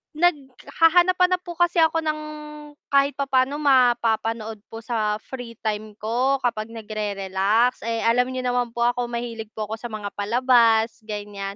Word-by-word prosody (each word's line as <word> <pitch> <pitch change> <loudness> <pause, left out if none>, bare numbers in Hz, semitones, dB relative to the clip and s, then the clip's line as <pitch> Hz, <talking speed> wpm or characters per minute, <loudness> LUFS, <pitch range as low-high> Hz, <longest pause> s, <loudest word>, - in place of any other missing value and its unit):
naghahanap-hanap 345 +4 +2
po 350 -1 -9
kasi 345 0 +2
ako 325 0 +3
ng 305 -1 -1 0.7
kahit 280 0 +3
papaano 270 0 +1
mapapanood 230 -5 +1
po 225 0 -9
sa 220 -3 -1
free 245 -3 -8
time 215 -1 -3
ko, 240 +6 0
kapag 215 -3 -1
nagre-relax 210 +1 -1
eh, 230 0 -1
alam 245 +2 +3
niyo 255 0 -4
naman 245 -1 -1
po 235 - 0
ako 245 0 +1
mahilig 235 -2 -5
po 215 - -3
ako 220 - -4
sa 240 - -6
mga 210 -3 -6
palabas 230 +1 +3
ganyan. 205 -2 -5
235 Hz, 145 wpm, -23 LUFS, 220-270 Hz, 0.7 s, ako